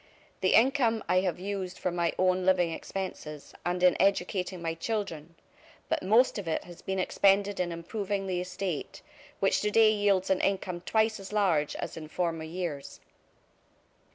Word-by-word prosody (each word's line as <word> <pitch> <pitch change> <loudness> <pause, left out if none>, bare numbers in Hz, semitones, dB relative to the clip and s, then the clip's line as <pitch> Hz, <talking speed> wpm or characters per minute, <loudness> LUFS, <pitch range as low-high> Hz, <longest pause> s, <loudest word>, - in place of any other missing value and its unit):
"The 185 - +3
income 235 -2 +3
I 180 +1 +3
have 185 -2 -1
used 190 -1 -4
for 180 - -2
my 170 -1 0
own 185 0 +2
living 180 -2 +3
expenses, 160 -5 -6
and 180 +1 -1
in 180 -1 +6
educating 185 -1 +1
my 165 -1 -2
children; 170 -4 -4 0.5
but - - 0
most 220 +4 +3
of 190 - -7
it 160 - -1
has 175 -1 -12
been 190 0 -3
expended 195 +2 +2
in 175 -1 0
improving 195 +4 -3
the 180 -2 -1
estate, 185 -3 -5 0.4
which - - +2
today 215 +1 +5
yields 200 -3 +2
an 190 - +2
income 185 -3 -1
twice 220 +3 +1
as 195 0 -9
large 180 -8 +1
as - - -5
in 155 -1 -7
former 165 -1 -2
years." 160 -4 -5
185 Hz, 160 wpm, -29 LUFS, 175-200 Hz, 0.5 s, in